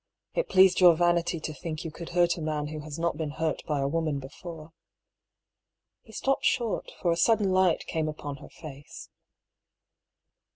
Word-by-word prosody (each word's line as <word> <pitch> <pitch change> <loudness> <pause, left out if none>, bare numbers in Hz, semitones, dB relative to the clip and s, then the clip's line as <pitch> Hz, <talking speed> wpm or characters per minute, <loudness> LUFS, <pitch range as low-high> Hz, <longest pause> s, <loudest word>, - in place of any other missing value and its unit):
It - - -1
pleased 190 -1 +6
your 175 -3 +8
vanity 175 0 +1
to 155 - -4
think 155 +2 -6
you 165 - -4
could 170 +1 -8
hurt 175 -1 +4
a 170 - -7
man 150 -1 -2
who 155 0 -6
has 150 0 -7
not 170 0 -1
been 160 -2 -2
hurt 160 +2 -2
by 150 -2 0
a 135 - +1
woman 155 -1 -1
before." 155 +4 -9 1.3
He 220 - -17
stopped 270 +4 0
short, 235 -4 0
for 175 - +1
a - - +2
sudden 205 +2 +3
light 185 -2 +3
came 155 -1 -1
upon 145 -2 -6
her - - -13
face. 145 -2 -11
165 Hz, 175 wpm, -28 LUFS, 155-175 Hz, 1.3 s, your